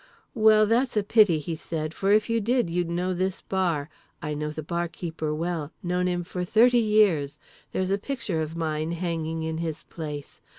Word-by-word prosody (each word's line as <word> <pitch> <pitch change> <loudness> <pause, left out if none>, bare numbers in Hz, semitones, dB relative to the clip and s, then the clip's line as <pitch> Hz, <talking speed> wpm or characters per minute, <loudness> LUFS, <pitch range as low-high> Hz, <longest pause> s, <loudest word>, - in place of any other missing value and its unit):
"Well, 215 -2 +6
that's 235 +2 +1
a 210 - +3
pity," 205 -5 +5
he 155 +2 -4
said, 155 -1 -4
"for 195 +3 0
if 215 0 +4
you 230 -1 +1
did 240 -4 +1
you'd 175 0 0
know 180 +2 -1
this 185 +1 -1
bar. 170 -7 -1 0.3
I 150 -1 -3
know 150 0 -3
the 155 +1 -6
barkeeper 170 -1 -3
well, 160 -1 -3
known 180 0 0
him 175 -1 -1
for 180 +1 -4
thirty 240 +6 +5
years. 195 -10 +3 0.3
There's 185 0 -1
a 200 - +1
picture 225 -9 -2
of 155 +1 -4
mine 155 0 -1
hanging 165 -2 -2
in 160 0 -3
his 160 -2 -4
place. 150 -3 -7
175 Hz, 185 wpm, -26 LUFS, 160-205 Hz, 0.3 s, Well